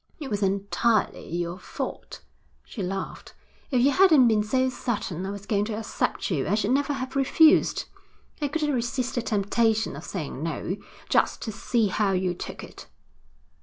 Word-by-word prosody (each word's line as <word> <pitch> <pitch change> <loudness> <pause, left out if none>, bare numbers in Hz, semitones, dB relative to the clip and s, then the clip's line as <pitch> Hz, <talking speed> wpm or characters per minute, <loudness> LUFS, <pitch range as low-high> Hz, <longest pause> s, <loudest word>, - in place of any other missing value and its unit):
'It 285 -5 -6
was 205 0 -1
entirely 200 +3 +1
your 175 +2 -3
fault,' - - -6 0.4
she 220 - -7
laughed. 190 +1 -5 0.3
'If 255 -4 +2
you 275 +3 +5
hadn't 310 -7 +6
been 220 -2 +3
so 255 +5 +1
certain 200 -8 -3
I - - -3
was 200 0 -7
going 200 0 +1
to 215 -1 -3
accept 220 -2 -2
you, 145 -6 0
I 200 - +2
should 215 +1 0
never 285 +2 +2
have 265 -1 -5
refused. 310 +4 +4 0.6
I 290 - +1
couldn't 295 0 -1
resist 245 +1 -1
the 240 - 0
temptation 220 +1 +1
of - - -8
saying 150 -7 -5
no, 165 +4 -3 0.3
just - - +1
to 220 - -3
see 220 0 0
how 195 0 +1
you 185 -1 0
took 180 - -7
it.' - - -11
220 Hz, 170 wpm, -26 LUFS, 195-260 Hz, 0.6 s, hadn't